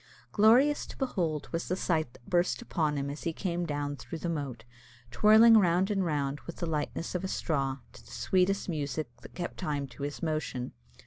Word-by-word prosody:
Glorious 245 +8 +4
to - - -10
behold 165 - -1
was 165 0 -2
the 185 - 0
sight 160 -8 0
that 120 - -19
burst 175 0 +1
upon 155 -10 -1
him 140 0 -2
as 145 - -7
he 165 - -1
came 175 -1 -2
down 145 -1 -2
through 165 - -7
the 170 - -3
moat, 135 -8 -4 0.5
twirling 220 - +7
round 185 +1 +2
and 195 -2 +1
round, 145 -4 -1
with 170 - -6
the 170 - -3
lightness 160 +1 -3
of 180 0 -2
a - - -1
straw, 135 -7 -1 0.2
to - - -14
the - - -17
sweetest 190 +1 +1
music 145 -6 -3
that - - -13
kept 175 - -5
time 145 -2 -2
to 140 - -13
his 145 +3 -4
motion. 155 -6 -2
165 Hz, 200 wpm, -30 LUFS, 145-185 Hz, 0.5 s, twirling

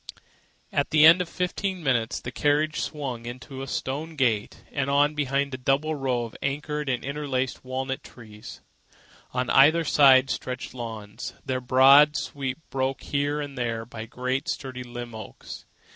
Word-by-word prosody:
At 140 - 0
the 155 -1 +6
end 170 +3 +8
of 175 - -4
fifteen 185 0 -2
minutes, 120 -4 0
the 125 - -7
carriage 150 +3 +1
swung 130 -6 -4
in 120 +1 -5
through 135 +1 -9
a 135 - -5
stone 150 +5 -4
gateway 115 -7 0
and 140 -1 -1
on 145 +2 +3
between 140 -1 0
a - - -3
double 135 +4 +1
row 130 -4 -1
of 115 - -8
arched 150 +1 -2
and 125 -1 -1
interlacing 135 -2 -2
walnut 130 +1 -3
trees. 110 -3 -12 0.7
On 125 0 -1
either 155 +5 +6
side 135 -3 +5
stretched 125 -1 -5
lawns, 110 -4 -7
their 130 -1 -2
broad 135 +4 +6
sweep 135 -2 -4
broken 135 0 -2
here 145 +1 0
and 145 -2 -5
there 115 -3 -2
by 110 -1 -8
great 130 +3 -2
sturdy 130 -3 -4
limbed 120 -1 -7
oaks. 110 -2 -9
135 Hz, 160 wpm, -26 LUFS, 125-145 Hz, 0.7 s, end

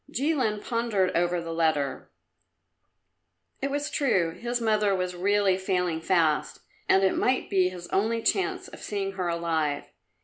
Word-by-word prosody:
Jilin 260 -7 0
pondered 230 -6 0
over 175 +1 +1
the 165 -1 -5
letter. 155 -4 0 1.5
It 275 - -1
was 290 +1 -2
true; 190 - +1
his 240 +6 -3
mother 215 -3 +2
was 180 -1 -2
really 195 +1 +2
failing 180 -4 -1
fast, 160 -3 +1 0.3
and 190 - +5
it 190 - +3
might 255 0 0
be 185 -2 +3
his 180 -1 -9
only 225 +3 0
chance 385 - 0
of - - -12
seeing 195 -2 -3
her 185 -2 -3
alive. 165 -4 -1
190 Hz, 145 wpm, -27 LUFS, 170-220 Hz, 1.5 s, and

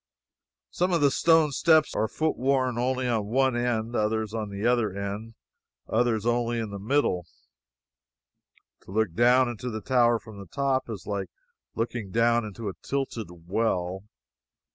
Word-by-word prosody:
Some 180 +1 0
of 170 - +2
the 140 -1 +4
stone 160 0 +4
steps 155 +2 +3
are 110 - 0
foot 155 +7 -1
worn 130 -2 +1
only 130 +1 0
on 110 -4 0
one 130 +2 +2
end; 120 -1 -1
others 110 0 0
only 115 - -2
on 105 - -5
the 100 +2 -4
other 120 -4 +2
end; 100 +3 -5 0.5
others 115 -2 +1
only 120 0 +1
in 110 -3 -3
the 100 - -6
middle. 105 - 0 1.6
To - - -12
look 105 -4 0
down 125 +4 +4
into 120 +1 -5
the 110 -2 -4
tower 120 +1 +3
from 110 -2 -12
the 100 - -10
top 135 - -1
is 100 -6 -6
like 100 -2 -3 0.5
looking 115 -2 -3
down 115 +3 +2
into 110 +1 -6
a 100 - -3
tilted 135 -6 -3 0.2
well. 95 -2 -1
115 Hz, 165 wpm, -27 LUFS, 105-130 Hz, 1.6 s, the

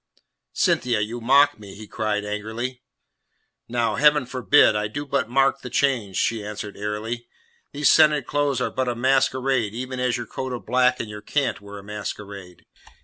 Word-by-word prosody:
"Cynthia, 120 -3 +1
you 115 +3 -4
mock 140 +2 +4
me," 100 -2 -11
he 110 +1 -10
cried 105 0 -2
angrily. 110 +4 -4 0.9
"Now, 120 -1 0
Heaven 150 -1 +4
forbid! 130 -1 +4
I 105 0 0
do 145 +8 -5
but 140 -4 -1
mark 135 +2 +2
the 125 - -7
change," 120 -8 0
she 115 -2 0
answered 105 0 -6
airily. 105 +3 -4 0.4
"These 145 0 +2
scented 150 -4 +5
clothes 145 -1 0
are - - -1
but 130 -1 -2
a 120 - -2
masquerade, 130 -2 +1
even 130 +1 -5
as 125 -1 0
your 120 - -5
coat 130 +3 -5
of 120 - -6
black 125 +2 +2
and 115 - -4
your 105 0 -8
cant 135 +2 -1
were 100 0 -10
a 100 - -10
masquerade. 100 -3 -8
120 Hz, 175 wpm, -23 LUFS, 105-130 Hz, 0.9 s, scented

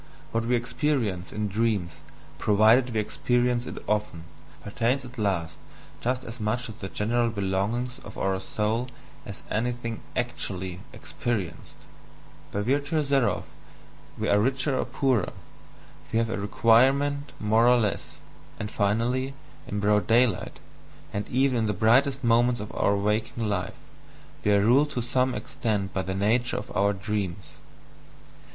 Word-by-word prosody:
What 115 0 0
we 125 +1 +2
experience 120 - -1
in 105 0 -2
dreams, 100 -5 -1 0.4
provided 110 +5 +5
we 110 - 0
experience 120 +3 0
it - - -6
often, 105 -5 -1 0.4
pertains 120 +6 0
at 125 -1 -10
last 85 -6 -1 0.4
just 125 +1 -1
as 115 0 -8
much 110 +3 -1
to - - -4
the 100 -3 -7
general 115 +4 +1
belongings 110 +5 -1
of - - -11
our 95 -1 0
soul 110 +5 -1 0.4
as 100 - -8
anything 115 0 -2
"actually" 95 -7 -3
experienced; 120 - -4 0.7
by 100 - -1
virtue 145 +7 +1
thereof 140 -3 +1 0.7
we - - -1
are 100 - +4
richer 135 +4 +1
or - - 0
poorer, 130 -9 0 0.8
we - - +1
have 115 -1 +1
a 105 - -2
requirement 135 +7 +3
more 110 +2 +3
or 125 0 +6
less, 105 -4 -2 0.4
and 105 +1 -4
finally, 120 +6 0 0.3
in 105 - -3
broad 105 0 +2
daylight, 120 0 +2 0.6
and 100 0 -3
even 130 -1 +2
in 110 - +1
the 105 - 0
brightest 130 +7 +3
moments 120 +1 +3
of 105 0 -6
our 100 - +2
waking 110 +2 -1
life, 95 -3 -2 0.7
we 105 - +3
are 100 -1 +5
ruled 130 +8 +4
to 150 - -3
some 125 +2 +1
extent 105 -5 -2
by 95 - 0
the 95 0 -3
nature 115 +5 +1
of 105 - -7
our 100 +1 +3
dreams. 100 -1 -4
115 Hz, 145 wpm, -26 LUFS, 100-125 Hz, 0.8 s, or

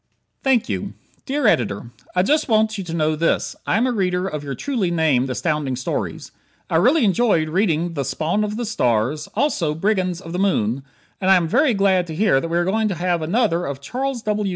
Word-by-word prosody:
Thank 255 -3 +2
You - - -3 0.3
Dear 285 0 -1
Editor: 120 - +1 0.2
I 180 - +3
just 295 +6 +1
want 220 0 +3
you 195 - -4
to 165 - -6
know 155 -1 +1
this: 165 +2 0
I - - +2
am 235 - +2
a 255 - +1
reader 185 -4 0
of 150 -5 -5
your 140 -1 -4
truly 240 -11 -1
named 155 -6 +1
Astounding 145 0 -1
Stories. 125 - -4 0.4
I - - +3
really 255 - +4
enjoyed 195 -6 +2
reading 170 -2 0
the 140 -3 -2
"Spawn 155 +10 -1
of 210 0 -3
the 240 - -2
Stars," 130 - 0
also 200 - 0
"Brigands 185 -1 0
of 165 -2 -9
the 180 - -2
Moon," 135 - +1 0.4
and 190 - +1
I 190 - +8
am 175 -3 +2
very 250 - +3
glad 190 -3 +2
to 160 - -6
hear 190 -7 +3
that - - -3
we 170 - 0
are 175 - +1
going 215 +4 +1
to 195 - -2
have 175 0 0
another 175 0 +1
of 140 -1 -5
Charles 250 - -3
W. 210 -2 -1
180 Hz, 215 wpm, -21 LUFS, 155-215 Hz, 0.4 s, I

